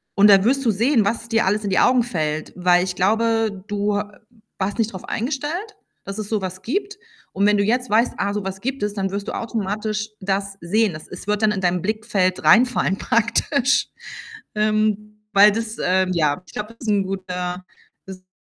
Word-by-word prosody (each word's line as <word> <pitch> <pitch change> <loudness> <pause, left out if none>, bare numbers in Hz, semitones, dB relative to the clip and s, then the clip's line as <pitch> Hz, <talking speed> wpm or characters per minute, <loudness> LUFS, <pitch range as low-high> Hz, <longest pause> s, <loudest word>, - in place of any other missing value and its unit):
und 205 +1 +6
da 195 -1 +7
wirst 270 +5 +2
du 225 - +4
sehen, 230 +2 +2
was 230 +3 -2
dir 225 -3 +2
alles 210 +2 +1
in 200 - -2
die - - +3
Augen 250 -1 +4
fällt. 155 -8 -3
Weil, 180 0 +3
ich 180 -1 -3
glaube, 220 0 +1
du 205 0 0
ha 205 0 -6 0.4
warst 195 +3 -2
nicht 225 -1 0
drauf 185 - -8
eingestellt, 305 - -3 0.3
dass 195 +1 -6
es 210 -1 -5
so 215 -2 0
was 185 0 -5
gibt. 400 - -3 0.4
Und 200 +2 +1
wenn 210 0 +4
du 200 - +2
jetzt 245 +4 0
weißt: 225 +4 +3
„Ah, 200 0 -1
so 205 -1 -3
was 190 0 -5
gibt 265 -2 -3
es.“, 205 - -1
dann 195 -2 -1
wirst 200 +1 -4
du - - -4
automatisch 215 -1 -3
das 195 +1 -2
sehen. 205 +3 +1
Das 155 - -9
es 180 +2 -9
wird 210 +1 0
dann 215 - +4
in 195 -2 -2
dein 180 0 +1
Blickfeld 205 -3 -1
reinfallen 235 -5 +4
praktisch. 240 +4 +1 0.7
Ähm, 210 0 0
weil 205 +1 +7
das, 225 +1 -4
ähm, 185 0 +2
ja, 150 0 0
ich - - -16
glaube, 210 +2 -6
das 235 - -8
ist - - +1
'n 200 -1 +2
guter 180 -1 -4 0.4
das 190 -1 -8
ist 185 0 -35
210 Hz, 205 wpm, -21 LUFS, 190-225 Hz, 0.7 s, da